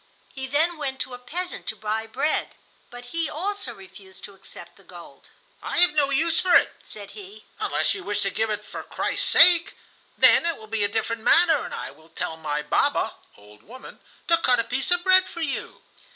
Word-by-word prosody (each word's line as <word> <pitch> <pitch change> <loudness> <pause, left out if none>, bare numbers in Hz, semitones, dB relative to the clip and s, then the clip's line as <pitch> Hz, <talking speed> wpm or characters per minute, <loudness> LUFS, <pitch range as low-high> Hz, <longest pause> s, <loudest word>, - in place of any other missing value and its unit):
He 265 -1 -6
then 315 +5 +2
went 270 -3 -4
to 255 - -5
a 245 - -8
peasant 355 +9 -6
to - - -3
buy 215 +1 -3
bread, 275 +7 -1 0.3
but 245 0 -12
he 330 -1 -1
also 390 -4 -3
refused 190 0 -15
to 200 - -10
accept 195 - -13
the - - -21
gold. - - -14 0.3
"I - - -4
have 350 -3 +5
no 290 -2 +2
use 325 +4 +2
for 365 -1 +3
it," - - +4
said 200 -1 -11
he, 205 +1 -12
"unless - - 0
you 390 - -7
wish 205 0 -2
to 195 -1 0
give 220 +2 -1
it 210 - -4
for - - -7
Christ's - - -3
sake; 345 0 +6 0.4
then 335 - +5
it 335 - -1
will 220 - -12
be 215 -1 -2
a - - +2
different 220 +2 -3
matter, 335 +7 +4
and - - -8
I - - -6
will 160 +3 -21
tell 160 0 -4
my 150 -2 -3
baba 150 - 0 0.2
[old 105 0 -18
woman] 255 +5 -13 0.3
to 335 0 +3
cut 250 -6 +2
a - - +1
piece 255 +3 -2
of 355 0 +1
bread 375 0 +5
for 340 - -8
you." 305 -4 -4
250 Hz, 210 wpm, -24 LUFS, 205-330 Hz, 0.4 s, sake